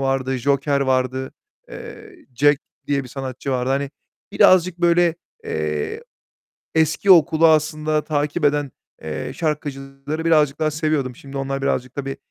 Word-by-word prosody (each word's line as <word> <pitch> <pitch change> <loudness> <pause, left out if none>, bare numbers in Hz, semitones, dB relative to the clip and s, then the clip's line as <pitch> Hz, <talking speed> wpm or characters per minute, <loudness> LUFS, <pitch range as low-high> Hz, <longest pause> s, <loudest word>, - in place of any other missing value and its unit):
vardı, 135 -1 0
Joker 140 +2 +1
vardı, 130 0 0 0.4
eee, 435 -5 -10 0.2
Jack 145 +2 +4 0.3
diye 140 -1 0
bir - - -10
sanatçı 135 +1 -5
vardı. 125 0 -1
Hani, 140 0 -1 0.4
birazcık 185 -1 +4
böyle, 175 -1 +3 0.3
eee, 75 -1 -3 0.7
eski 160 +5 +3
okulu 165 -1 +6
aslında 155 0 +1
takip 150 +1 -1
eden, 145 -1 +1 0.3
eee, 75 +8 -4
şarkıcıları 145 0 -4
birazcık 150 -4 +3
daha 155 0 +1
seviyordum. 150 -5 -1
Şimdi 140 0 -9
onlar 135 0 -3
birazcık, 130 -2 -2
tabii, 135 -1 -4
140 Hz, 130 wpm, -21 LUFS, 135-155 Hz, 0.7 s, okulu